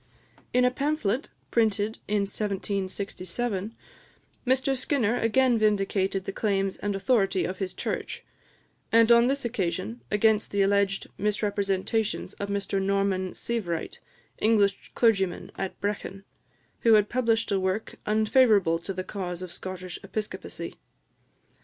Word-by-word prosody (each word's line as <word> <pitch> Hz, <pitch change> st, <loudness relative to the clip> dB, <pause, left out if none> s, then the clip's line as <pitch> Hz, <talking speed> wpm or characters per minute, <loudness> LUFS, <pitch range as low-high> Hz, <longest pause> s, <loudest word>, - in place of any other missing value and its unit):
In 250 Hz, 0 st, +4 dB
a 250 Hz, -, +4 dB
pamphlet 275 Hz, -, -1 dB, 0.2 s
printed 220 Hz, -1 st, +1 dB
in 210 Hz, 0 st, +1 dB
1767, 200 Hz, +1 st, -3 dB, 0.7 s
Mr 265 Hz, +1 st, +2 dB
Skinner 245 Hz, -3 st, +1 dB
again 240 Hz, +1 st, +3 dB
vindicated 195 Hz, -2 st, +1 dB
the -, -, -3 dB
claims 195 Hz, -2 st, 0 dB
and 205 Hz, -1 st, -2 dB
authority 195 Hz, -3 st, +2 dB
of 185 Hz, 0 st, -4 dB
his 190 Hz, -2 st, -2 dB
Church; -, -, -4 dB, 0.7 s
and 230 Hz, +1 st, +6 dB
on 235 Hz, +1 st, +7 dB
this 275 Hz, 0 st, -1 dB
occasion, 170 Hz, -, -2 dB
against 215 Hz, 0 st, +3 dB
the 200 Hz, -1 st, +2 dB
alleged 195 Hz, 0 st, +2 dB
misrepresentations 205 Hz, +1 st, 0 dB
of 200 Hz, -, -3 dB
Mr 200 Hz, -1 st, -1 dB
Norman 195 Hz, -1 st, 0 dB
Sievewright, 185 Hz, -9 st, -3 dB, 0.4 s
English 205 Hz, -3 st, +2 dB
clergyman 195 Hz, -6 st, +2 dB
at 195 Hz, -, -4 dB
Brechin, 200 Hz, -1 st, -3 dB, 0.6 s
who 230 Hz, -1 st, +6 dB
had 210 Hz, -1 st, +4 dB
published 230 Hz, -3 st, +1 dB
a 195 Hz, -, +2 dB
work 190 Hz, +3 st, -2 dB
unfavourable 215 Hz, -5 st, +4 dB
to 195 Hz, +3 st, -5 dB
the 185 Hz, -, -3 dB
cause 185 Hz, -2 st, -5 dB
of 180 Hz, -, -7 dB
Scottish 185 Hz, -1 st, -6 dB
Episcopacy. 210 Hz, +2 st, -5 dB
200 Hz, 125 wpm, -27 LUFS, 195-225 Hz, 0.7 s, on